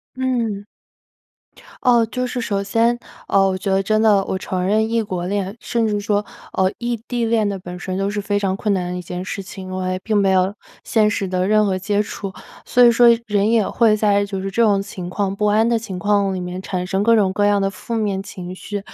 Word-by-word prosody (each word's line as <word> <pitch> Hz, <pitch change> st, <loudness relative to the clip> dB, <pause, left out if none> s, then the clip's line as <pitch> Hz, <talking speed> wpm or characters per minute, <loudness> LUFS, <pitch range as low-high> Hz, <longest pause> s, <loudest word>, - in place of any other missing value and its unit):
嗯， 240 Hz, -6 st, -1 dB, 1.2 s
哦， 240 Hz, -2 st, +4 dB
就 250 Hz, +3 st, -3 dB
是 245 Hz, 0 st, -3 dB
首 200 Hz, -4 st, -1 dB
先， 230 Hz, +4 st, +1 dB, 0.3 s
呃， 195 Hz, -1 st, +4 dB
我 190 Hz, -1 st, -1 dB
觉 195 Hz, +1 st, -2 dB
得 190 Hz, 0 st, +3 dB
真 215 Hz, +2 st, +1 dB
的 210 Hz, -3 st, +5 dB
我 190 Hz, -, -2 dB
承 185 Hz, -1 st, -3 dB
认 215 Hz, +3 st, +2 dB
异 230 Hz, 0 st, +1 dB
国 185 Hz, -5 st, -4 dB
恋， 195 Hz, +1 st, -2 dB
甚 230 Hz, -2 st, 0 dB
至 205 Hz, -1 st, -1 dB
说， 205 Hz, 0 st, 0 dB, 0.3 s
呃， 190 Hz, 0 st, +2 dB
异 240 Hz, 0 st, -2 dB
地 240 Hz, -1 st, -1 dB
恋 225 Hz, -2 st, +2 dB
的 200 Hz, -1 st, -2 dB
本 180 Hz, 0 st, -8 dB
身 185 Hz, 0 st, -4 dB
都 195 Hz, +1 st, 0 dB
是 205 Hz, 0 st, -3 dB
非 205 Hz, 0 st, -1 dB
常 195 Hz, -1 st, -1 dB
困 210 Hz, 0 st, 0 dB
难 180 Hz, -2 st, -2 dB
的 180 Hz, -, -3 dB
一 -, -, -5 dB
件 180 Hz, +1 st, -6 dB
事 195 Hz, +2 st, -5 dB
情。 190 Hz, -1 st, -9 dB
我 185 Hz, 0 st, -3 dB
也 185 Hz, -, -1 dB
并 215 Hz, +1 st, -1 dB
没 195 Hz, -1 st, +3 dB
有 190 Hz, +1 st, +2 dB, 0.3 s
现 215 Hz, -2 st, +2 dB
实 205 Hz, -1 st, -1 dB
的 185 Hz, 0 st, 0 dB
任 215 Hz, 0 st, +4 dB
何 190 Hz, -2 st, 0 dB
接 205 Hz, +2 st, 0 dB
触， 200 Hz, -1 st, -6 dB, 0.3 s
所 250 Hz, -, +4 dB
以 240 Hz, -, +8 dB
说 240 Hz, +1 st, +5 dB, 0.2 s
人 205 Hz, -1 st, +1 dB
也 225 Hz, -3 st, +3 dB
会 225 Hz, -3 st, +3 dB
在 205 Hz, -1 st, +2 dB
就 195 Hz, -1 st, -4 dB
是 195 Hz, 0 st, -4 dB
这 230 Hz, +5 st, +1 dB
种 205 Hz, -3 st, +3 dB
情 190 Hz, -3 st, -7 dB
况 195 Hz, +1 st, -1 dB
不 210 Hz, +2 st, -1 dB
安 215 Hz, +2 st, +3 dB
的 235 Hz, -1 st, +2 dB
情 210 Hz, -5 st, -6 dB
况 200 Hz, 0 st, +1 dB
里 185 Hz, -, -3 dB
面， 180 Hz, +1 st, -5 dB
产 180 Hz, -1 st, -3 dB
生 190 Hz, +1 st, -1 dB
各 230 Hz, +1 st, +5 dB
种 200 Hz, -4 st, +3 dB
各 205 Hz, +2 st, +1 dB
样 205 Hz, -1 st, +3 dB
的 195 Hz, -, +1 dB
负 195 Hz, +4 st, -6 dB
面 205 Hz, -3 st, -1 dB
情 180 Hz, -2 st, -8 dB
绪。 205 Hz, +2 st, -5 dB
200 Hz, 260 characters per minute, -20 LUFS, 190-220 Hz, 1.2 s, 以